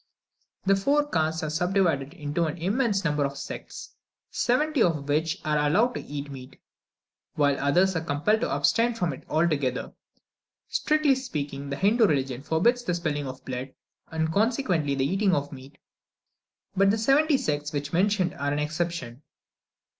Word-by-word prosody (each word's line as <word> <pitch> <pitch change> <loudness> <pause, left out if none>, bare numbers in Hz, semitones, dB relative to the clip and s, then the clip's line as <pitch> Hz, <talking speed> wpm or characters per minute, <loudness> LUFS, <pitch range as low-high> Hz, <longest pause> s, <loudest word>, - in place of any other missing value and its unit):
The 195 +1 +4
four 290 +9 +2
castes 160 - 0
are 155 - -2
subdivided 170 -4 0
into 155 +1 -1
an 155 +2 -3
immense 200 +3 0
number 150 -3 +1
of 140 0 -3
sects, 140 - -8 0.4
seventy 295 +3 +1
of 155 -7 +1
which 160 +5 0
are 150 -1 +1
allowed 195 +12 +2
to - - -4
eat 145 0 -6
meat, 130 -1 -11 0.8
while 145 -2 +3
others 175 +7 +2
are 165 - 0
compelled 165 +8 +1
to - - 0
abstain 235 +1 +2
from 175 -9 -1
it 130 - -11
altogether. 150 -5 0 0.8
Strictly 305 -2 +2
speaking, 145 - -4
the 140 - -2
Hindoo 215 +6 +3
religion 135 -5 -1
forbids 205 - +1
the 180 -6 -1
spilling 150 -4 -2
of 130 0 -9
blood, 130 +1 -5 0.4
and 160 0 -1
consequently 200 - +1
the 135 -1 0
eating 190 +4 +2
of 145 0 -2
meat; 135 +1 -12 1.0
but 195 +1 +4
the 210 - +2
seventy 275 +6 +3
sects 150 - -2
just 145 -1 -4
mentioned 185 0 +2
are 145 0 -2
an 145 - -1
exception. 150 -4 -3
160 Hz, 160 wpm, -26 LUFS, 145-200 Hz, 1.0 s, The